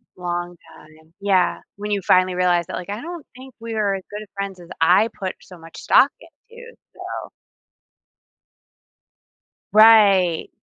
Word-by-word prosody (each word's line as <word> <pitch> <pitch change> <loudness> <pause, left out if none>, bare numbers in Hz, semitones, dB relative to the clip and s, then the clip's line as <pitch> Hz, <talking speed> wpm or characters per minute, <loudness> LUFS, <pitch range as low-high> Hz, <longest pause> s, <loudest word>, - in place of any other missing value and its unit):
Long 175 0 -5 0.2
time, 160 +1 -20
yeah, 190 -3 +1 0.2
when 210 +1 -6
you 200 -1 0
finally 185 +1 +3
realize 180 -1 +1
that, - - -6
like, 180 - -7
"I 210 +3 -5
don't 340 -1 -8
think 260 0 -13
we 230 0 -6
are 205 -2 0
as 190 - -7
good 210 +1 -7
friends 200 -2 -6
as 175 - -14
I 185 +7 +4
put 190 -1 -4
so 180 - -14
much 165 0 -14
stock 275 - +4
into," 470 +9 -16 0.2
so - - -7 2.4
Right. 205 -6 +5
195 Hz, 145 wpm, -21 LUFS, 175-225 Hz, 2.4 s, Right